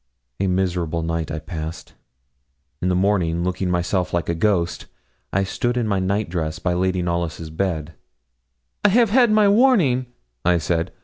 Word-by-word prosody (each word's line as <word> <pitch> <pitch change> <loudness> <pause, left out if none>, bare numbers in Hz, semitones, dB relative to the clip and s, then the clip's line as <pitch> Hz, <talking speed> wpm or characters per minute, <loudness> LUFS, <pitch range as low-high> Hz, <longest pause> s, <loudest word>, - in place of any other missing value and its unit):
A 95 - +1
miserable 90 -3 -1
night 85 -1 -2
I 80 - -3
passed. 80 0 -7 0.9
In 90 - +1
the 90 - +1
morning, 90 -3 +1
looking 90 +1 -1
myself 90 +1 0
like 85 - -1
a - - +2
ghost, 85 -1 0 0.4
I 100 - +1
stood 120 +5 -1
in 120 -3 0
my 100 -2 +1
night 100 +3 0
dress 80 -3 -3
by 90 - -1
Lady 90 0 0
Knollys' 85 -2 -3
bed. 80 -2 -2 0.9
'I - - +6
have 225 +1 +4
had 245 0 +5
my 215 -1 +4
warning,' 200 - +4 0.4
I 90 0 +3
said. 85 +1 -1
90 Hz, 165 wpm, -22 LUFS, 85-105 Hz, 0.9 s, I